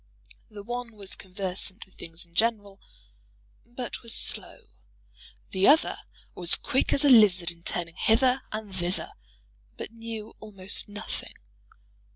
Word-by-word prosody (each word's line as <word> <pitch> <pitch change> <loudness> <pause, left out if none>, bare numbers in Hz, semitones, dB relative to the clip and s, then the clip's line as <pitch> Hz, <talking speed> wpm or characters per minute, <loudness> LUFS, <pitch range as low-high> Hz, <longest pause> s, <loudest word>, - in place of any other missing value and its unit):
The 205 -1 -10
one 240 0 -6
was 200 -2 -9
conversant 190 +1 -5
with 190 - -26
things 165 +1 -10
in 170 - -29
general, 205 -1 -1 0.9
but 240 +1 -7
was 230 -1 0
slow; - - +2 0.9
the 190 0 +2
other 310 +3 +4 0.4
was 175 -1 +8
quick 265 -1 0
as 280 - +3
a - - +5
lizard 190 -7 +5
in 170 0 -16
turning 170 -1 -3
hither 255 +3 +3
and 215 -3 -6
thither, 175 0 -3 0.7
but - - -7
knew 225 -1 -8
almost 200 -2 -2
nothing. 205 +1 -7
205 Hz, 135 wpm, -26 LUFS, 185-230 Hz, 0.9 s, was